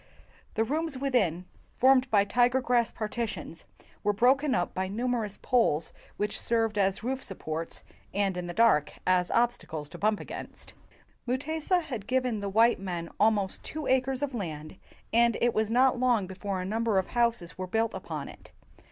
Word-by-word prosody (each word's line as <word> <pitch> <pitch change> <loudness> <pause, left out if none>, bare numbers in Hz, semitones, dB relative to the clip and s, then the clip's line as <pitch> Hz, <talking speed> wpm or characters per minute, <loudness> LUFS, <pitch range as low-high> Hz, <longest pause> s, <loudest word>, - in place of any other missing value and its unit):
The 225 - +2
rooms 305 +3 -2
within, 215 - 0 0.3
formed 260 0 +5
by 200 -3 +4
tiger 245 +4 +3
grass 245 -2 +1
partitions, 215 -6 -5 0.4
were 205 - +2
broken 260 +5 +3
up 175 - -1
by 185 0 -2
numerous 225 0 -2
poles 225 - +2 0.2
which 210 0 -2
served 225 -2 +1
as 195 +1 +1
roof 260 +2 -2
supports, 165 -4 -5 0.3
and 195 -1 0
in 180 -1 -4
the 175 - -5
dark 185 -10 +4
as 180 -1 +2
obsta 240 +1 +1
cles 150 -2 -6
to - - -9
bump 210 0 +2
against. - - -9 0.5
Mutesa 315 +7 0
had 240 -9 -6
given 255 -4 0
the 200 0 -3
white 225 +3 +4
men 175 -3 -5
almost 205 -3 +2
two 310 -1 -6
acres 260 +1 +1
of 280 -2 -2
land, 160 -7 -5 0.4
and 235 0 +4
it 240 -1 +2
was 215 0 0
not 250 +2 +3
long 245 -5 +2
before 190 +1 -4
a 185 - -3
number 220 +1 0
of 190 - +2
houses 230 -9 0
were 185 - -3
built 225 +4 0
upon - - -5
it. - - -13
225 Hz, 170 wpm, -28 LUFS, 190-250 Hz, 0.5 s, formed